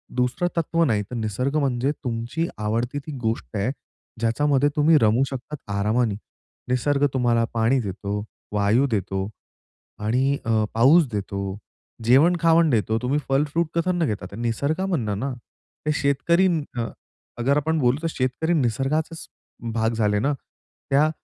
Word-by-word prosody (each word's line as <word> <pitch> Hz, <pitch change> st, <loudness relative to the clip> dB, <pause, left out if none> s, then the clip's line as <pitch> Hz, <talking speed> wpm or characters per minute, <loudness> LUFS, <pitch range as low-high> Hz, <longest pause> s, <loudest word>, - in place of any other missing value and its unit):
दुसरं 125 Hz, +8 st, +1 dB
तत्व 165 Hz, 0 st, +1 dB
नाही 110 Hz, -7 st, +1 dB
तर -, -, -4 dB
निसर्ग 120 Hz, +5 st, -2 dB
म्हणजे 135 Hz, -1 st, +1 dB
तुमची 120 Hz, +7 st, -2 dB
आवडती 115 Hz, +5 st, -1 dB
ती 145 Hz, +2 st, -9 dB
गोष्ट 110 Hz, -1 st, -2 dB
आहे, 100 Hz, +6 st, 0 dB, 0.5 s
ज्याच्यामध्ये 140 Hz, +5 st, +2 dB
तुम्ही 155 Hz, +2 st, +5 dB
रमू 110 Hz, +4 st, +4 dB
शकतात, 135 Hz, +3 st, -6 dB, 0.2 s
आरामाने. 110 Hz, +1 st, +1 dB, 0.5 s
निसर्ग 140 Hz, +3 st, +2 dB
तुम्हाला 120 Hz, -3 st, +2 dB
पाणी 115 Hz, +3 st, +2 dB
देतो, 100 Hz, 0 st, -4 dB, 0.3 s
वायू 105 Hz, +6 st, +3 dB
देतो 95 Hz, -1 st, -1 dB, 0.8 s
आणि 130 Hz, +5 st, +2 dB
अ, 110 Hz, -2 st, +2 dB
पाऊस 140 Hz, +8 st, +5 dB
देतो, 100 Hz, -1 st, -3 dB, 0.5 s
जेवण-खावण 165 Hz, +6 st, +5 dB
देतो. 110 Hz, -3 st, +1 dB
तुम्ही 135 Hz, +4 st, +1 dB
फल, 135 Hz, +2 st, +3 dB
फ्रूट 165 Hz, +3 st, 0 dB
कशातनं 175 Hz, 0 st, +1 dB
घेता? 100 Hz, -6 st, -4 dB
निसर्गा 140 Hz, -, -1 dB
मधनं 115 Hz, -, -1 dB
ना? 135 Hz, +3 st, -2 dB, 0.5 s
ते 150 Hz, -, +2 dB
शेतकरी 150 Hz, +6 st, +2 dB
न 145 Hz, -9 st, -2 dB, 0.5 s
अगर 135 Hz, +4 st, +2 dB
आपण 160 Hz, +2 st, +1 dB
बोलू 125 Hz, -1 st, +3 dB
तर 165 Hz, -, -1 dB
शेतकरी 135 Hz, +4 st, -1 dB
निसर्गाचाच 150 Hz, +4 st, -1 dB, 0.5 s
भाग 115 Hz, 0 st, +1 dB
झाले 105 Hz, -2 st, +1 dB
ना? 140 Hz, +7 st, +1 dB, 0.6 s
त्या 145 Hz, +3 st, +4 dB
125 Hz, 140 wpm, -24 LUFS, 110-150 Hz, 0.8 s, तुम्ही